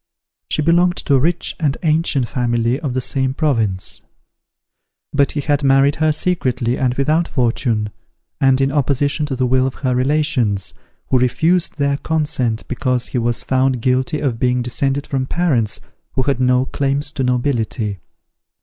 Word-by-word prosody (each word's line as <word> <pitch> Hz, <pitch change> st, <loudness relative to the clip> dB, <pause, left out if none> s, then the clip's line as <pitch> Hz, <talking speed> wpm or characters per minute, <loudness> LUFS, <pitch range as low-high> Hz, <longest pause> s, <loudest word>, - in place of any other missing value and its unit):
She 155 Hz, -, 0 dB
belonged 175 Hz, +2 st, +3 dB
to 140 Hz, -, -1 dB
a 135 Hz, -, +5 dB
rich 165 Hz, +5 st, 0 dB
and 150 Hz, -3 st, 0 dB
ancient 155 Hz, -5 st, +1 dB
family 120 Hz, +1 st, 0 dB
of 140 Hz, -6 st, -3 dB
the 130 Hz, -, 0 dB
same 130 Hz, +1 st, -1 dB
province: 115 Hz, -, -1 dB, 1.1 s
but 140 Hz, -1 st, +2 dB
he 145 Hz, -, -1 dB
had 145 Hz, 0 st, 0 dB
married 135 Hz, +1 st, +4 dB
her 155 Hz, 0 st, +2 dB
secretly 130 Hz, -8 st, 0 dB
and 125 Hz, -2 st, 0 dB
without 155 Hz, +5 st, +1 dB
fortune, 115 Hz, -4 st, 0 dB, 0.5 s
and 135 Hz, -1 st, +3 dB
in 135 Hz, 0 st, +2 dB
opposition 145 Hz, +1 st, 0 dB
to 135 Hz, -, -3 dB
the 130 Hz, 0 st, 0 dB
will 130 Hz, +1 st, +2 dB
of 135 Hz, -, -5 dB
her 130 Hz, -, +2 dB
relations, 125 Hz, -, 0 dB, 0.4 s
who 130 Hz, -, +4 dB
refused 160 Hz, +9 st, +1 dB
their 140 Hz, -1 st, +1 dB
consent 145 Hz, -8 st, -1 dB
because 125 Hz, -1 st, -1 dB
he 125 Hz, -, -1 dB
was 120 Hz, 0 st, -1 dB
found 130 Hz, -1 st, +1 dB
guilty 130 Hz, +5 st, 0 dB
of 130 Hz, -6 st, -1 dB
being 125 Hz, 0 st, +1 dB
descended 135 Hz, +3 st, -1 dB
from 130 Hz, -1 st, -2 dB
parents 135 Hz, -12 st, 0 dB, 0.3 s
who 130 Hz, -, 0 dB
had 135 Hz, -1 st, 0 dB
no 125 Hz, 0 st, +3 dB
claims 140 Hz, +1 st, -1 dB
to 145 Hz, -3 st, -3 dB
nobility. 120 Hz, -5 st, -1 dB
135 Hz, 160 wpm, -18 LUFS, 125-145 Hz, 1.1 s, a